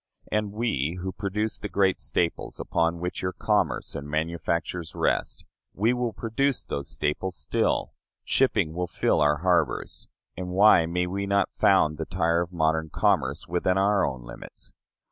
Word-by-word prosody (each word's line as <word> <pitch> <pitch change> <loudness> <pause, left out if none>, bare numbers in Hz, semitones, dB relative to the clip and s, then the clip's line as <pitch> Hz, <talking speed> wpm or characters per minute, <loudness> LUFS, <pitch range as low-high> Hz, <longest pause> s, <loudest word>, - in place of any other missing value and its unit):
And 105 -1 0
we 90 - -1
who 95 +1 -3
produce 105 +3 -2
the 105 - -5
great 95 -2 +2
staples 85 -1 -1
upon 85 +1 0
which 90 +1 -4
your 90 0 -2
commerce - - 0
and 70 +1 -6
manufactures 85 +1 -2
rest, - - -1 0.3
we 110 +5 +2
will 125 -1 -1
produce 120 +5 -1
those 70 - -4
staples 90 +5 -2
still; 65 -3 0 0.3
shipping 80 - +2
will 90 +1 -2
fill 80 - +1
our 75 0 +4
harbors; 85 -8 0 0.3
and 90 0 -5
why 90 -3 +5
may 90 +1 0
we 100 +2 -3
not 100 0 +1
found 75 0 +3
the 80 - -2
Tyre 85 -2 +1
of 85 0 -4
modern 80 -2 0
commerce 70 +2 +1
within 90 +2 +1
our 100 +1 +3
own 65 -3 -2
limits? - - -11
90 Hz, 160 wpm, -26 LUFS, 80-100 Hz, 0.3 s, why